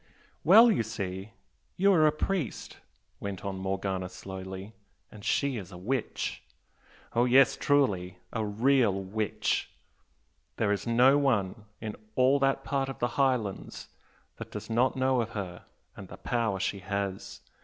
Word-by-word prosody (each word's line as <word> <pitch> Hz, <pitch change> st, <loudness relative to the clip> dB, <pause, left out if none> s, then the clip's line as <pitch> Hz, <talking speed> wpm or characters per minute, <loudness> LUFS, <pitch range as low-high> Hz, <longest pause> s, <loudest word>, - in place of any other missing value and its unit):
"Well, 220 Hz, -, +8 dB
you 195 Hz, -, +2 dB
see, 100 Hz, -2 st, -5 dB, 0.4 s
you 195 Hz, +2 st, +5 dB
are 155 Hz, -3 st, +5 dB
a -, -, +4 dB
priest," 155 Hz, -, -3 dB, 0.4 s
went 100 Hz, -2 st, -6 dB
on 95 Hz, -1 st, -3 dB
Morgana, 95 Hz, -1 st, -2 dB
slowly, 95 Hz, +2 st, -8 dB, 0.4 s
"and 105 Hz, -1 st, -12 dB
she 140 Hz, +2 st, +1 dB
is 95 Hz, -3 st, -8 dB
a 90 Hz, -, -9 dB
witch. 120 Hz, +7 st, -3 dB, 0.7 s
Oh 120 Hz, +1 st, +3 dB
yes, 130 Hz, +2 st, +5 dB
truly! 100 Hz, -11 st, +1 dB, 0.2 s
a 110 Hz, -, -1 dB
real 115 Hz, +2 st, +3 dB
witch! 105 Hz, +3 st, -1 dB, 0.9 s
There 105 Hz, -2 st, +1 dB
is 105 Hz, +3 st, -2 dB
no 125 Hz, +4 st, +5 dB
one 105 Hz, -7 st, 0 dB
in 110 Hz, -2 st, -5 dB, 0.2 s
all 130 Hz, +2 st, +4 dB
that 135 Hz, 0 st, +1 dB
part 135 Hz, -1 st, -1 dB
of 135 Hz, -, -6 dB
the 120 Hz, -, 0 dB
Highlands 125 Hz, -6 st, -1 dB, 0.5 s
that -, -, -8 dB
does -, -, -7 dB
not 125 Hz, +3 st, +2 dB
know 130 Hz, -1 st, +2 dB
of 115 Hz, -, -3 dB
her, 90 Hz, -3 st, -6 dB, 0.3 s
and -, -, -9 dB
the -, -, -11 dB
power 115 Hz, -5 st, -1 dB
she 100 Hz, -, -2 dB
has! 100 Hz, 0 st, -4 dB
110 Hz, 150 wpm, -29 LUFS, 95-135 Hz, 0.9 s, Well